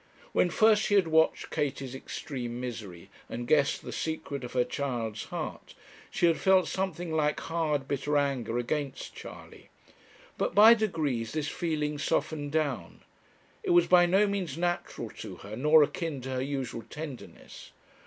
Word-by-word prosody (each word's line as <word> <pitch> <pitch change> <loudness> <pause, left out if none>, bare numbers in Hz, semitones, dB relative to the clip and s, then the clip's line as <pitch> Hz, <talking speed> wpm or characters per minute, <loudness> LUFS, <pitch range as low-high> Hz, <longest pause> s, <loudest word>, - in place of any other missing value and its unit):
When 180 - +3
first 215 +4 +4
she 205 - +1
had 190 -4 +4
watched 160 0 +2
Katie's 135 -3 -2
extreme 125 -2 -5
misery, 110 -9 -7 0.2
and 120 +1 -5
guessed 145 -1 +2
the - - -6
secret 145 -4 -4
of 125 - -7
her 125 -1 +3
child's 120 -6 -3
heart, - - -6 0.3
she - - +1
had 165 -1 +3
felt 190 -1 +4
something 175 -3 -3
like 150 -1 +1
hard, 155 -4 -1
bitter 145 +1 0
anger 130 -5 0
against 135 +3 -3
Charley. - - -11 0.7
But - - -1
by 215 +3 +9
degrees 155 - -1
this 155 -1 -1
feeling 150 -3 -2
softened 145 -1 -1
down. 155 -2 -2 0.6
It 405 - -4
was 350 0 +6
by 175 -1 +6
no 195 +4 +4
means 195 -8 -2
natural 175 0 -2
to - - -7
her, 105 +2 -9
nor 150 +5 +6
akin 150 0 -3
to 130 +1 -6
her 130 0 -1
usual 135 -3 -3
tenderness. 150 -4 -9
150 Hz, 155 wpm, -29 LUFS, 130-170 Hz, 0.7 s, by